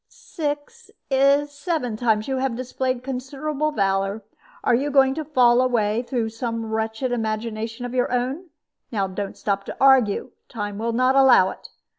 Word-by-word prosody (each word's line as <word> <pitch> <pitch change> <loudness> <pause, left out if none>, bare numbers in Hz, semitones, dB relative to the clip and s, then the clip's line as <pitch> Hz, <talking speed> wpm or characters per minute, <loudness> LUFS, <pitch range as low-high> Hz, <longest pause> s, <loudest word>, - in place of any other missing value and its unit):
"Six, 415 -2 -6 0.2
if 275 +2 +4
not 290 - -9
seven, 285 - -2
times 215 -2 +1
you 265 -1 -1
have 260 -2 -1
displayed 255 0 -3
considerable 275 +3 -3
valor. 195 -2 0 0.4
Are - - +3
you 270 +5 +1
going 270 -1 +4
to 310 +2 -4
fall 250 -5 +4
away 230 -3 +1
through 240 -3 -2
some 230 0 -4
wretched 220 +3 -2
imagination 225 0 -3
of 245 - -6
your 250 -1 0
own? 260 +8 -2 0.4
Now 200 -4 0
don't 195 +1 -5
stop 200 -1 -1
to - - -7
argue 265 -7 +4 0.2
time 205 -3 -5
will 230 +1 -1
not 255 +2 +2
allow 255 -9 +6
it. - - -12
250 Hz, 165 wpm, -23 LUFS, 220-275 Hz, 0.4 s, allow